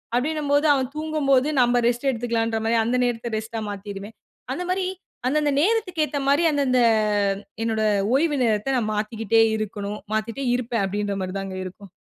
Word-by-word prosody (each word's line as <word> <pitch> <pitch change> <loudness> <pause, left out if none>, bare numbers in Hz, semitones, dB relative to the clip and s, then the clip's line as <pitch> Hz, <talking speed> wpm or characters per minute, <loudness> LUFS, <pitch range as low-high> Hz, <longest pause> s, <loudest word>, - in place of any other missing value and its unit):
அப்பிடின்னும்போது, 290 +2 +1
அவன் 260 -1 -2
தூங்கும்போது 295 -3 +2
நம்ம 245 0 +3
ரெஸ்ட் 245 +3 +1
எடுத்துக்கலான்றமாரி 230 -1 0
அந்த 250 +2 +1
நேரத்த 235 -1 -2
ரெஸ்ட்டா 220 +1 -5
மாத்திருவேன். 200 +1 -8 0.4
அந்தமாரி 365 +4 -1 0.4
அந்தந்த 295 +2 +2
நேரத்துக்கு 385 -4 +1
ஏத்தமாரி 285 +1 +1
அந்தந்த 275 -3 +2 0.8
என்னோட 220 -1 0 0.3
ஓய்வு 295 +1 +2
நேரத்த 225 +3 +1
நான் 215 -3 -1
மாத்திக்கிட்டே 225 +1 +1 0.2
இருக்கணும். 210 -1 -4
மாத்திக்கிட்டே 230 +5 -2
இருப்பேன் 235 -4 -1
அப்பிடின்ற 205 +1 -2
மாரி 185 0 -4
தாங்க 195 -1 -5
இருக்கும். 190 +2 -10
240 Hz, 135 wpm, -23 LUFS, 215-285 Hz, 0.8 s, நம்ம